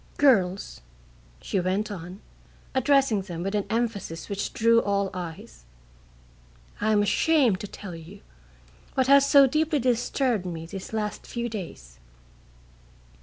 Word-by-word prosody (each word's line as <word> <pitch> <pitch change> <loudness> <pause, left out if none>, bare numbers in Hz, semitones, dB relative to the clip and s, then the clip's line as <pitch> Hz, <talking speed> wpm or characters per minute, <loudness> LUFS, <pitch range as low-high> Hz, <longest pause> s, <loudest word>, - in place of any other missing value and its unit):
"Girls," 200 -9 +2 0.6
she 195 - -1
went 190 +4 -1
on, 180 +1 -8 0.5
addressing 265 -5 +3
them 175 -2 -6
with 195 +2 -3
an 205 -1 -1
emphasis 220 -8 -3
which 200 0 -3
drew 230 +1 +4
all 200 -1 0
eyes, 160 - -8 1.2
"I 215 +1 +2
am 205 -1 +3
ashamed 245 -2 +3
to 205 - -6
tell 195 -2 -9
you 165 +5 -11 0.7
what 260 - +2
has 280 +1 +5
so 280 -1 +8
deeply 305 +3 +1
disturbed 245 -3 0
me 165 -2 -5
these 190 +2 -8
last 215 -1 -4
few 240 0 -3
days. 175 - -8
205 Hz, 130 wpm, -26 LUFS, 185-245 Hz, 1.2 s, so